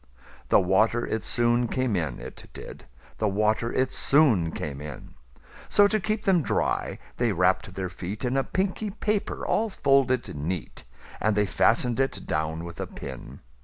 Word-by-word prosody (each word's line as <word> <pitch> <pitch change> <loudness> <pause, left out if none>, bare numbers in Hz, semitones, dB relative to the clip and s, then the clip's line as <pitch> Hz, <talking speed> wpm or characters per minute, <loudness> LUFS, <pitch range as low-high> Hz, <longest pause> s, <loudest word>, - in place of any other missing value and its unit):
The - - +6
water 105 +5 +2
it 110 -1 -3
soon 120 0 +2
came 130 -3 -1
in, 80 -8 -2
it - - -10
did; - - -10 0.3
The 110 - +1
water 110 +3 +1
it 130 0 0
soon 120 - +4
came 70 -3 -5
in:So, 75 - -2
to 215 +1 0
keep 215 +2 -2
them 185 -4 +3
dry, - - -1 0.2
they 120 -2 +1
wrapp'd 95 0 +1
their 95 -1 -3
feetIn 105 +8 -4
a 135 - +2
pinky 195 +5 -2
paper 210 0 -2
all 225 0 +1
folded 135 - +1
neat:And 80 - -4
they 105 - +3
fasten'd 115 +5 +2
it 135 0 -1
down 80 +1 -2
with 85 - -9
a - - -4
pin. 65 -3 -9
110 Hz, 155 wpm, -26 LUFS, 90-135 Hz, 0.3 s, The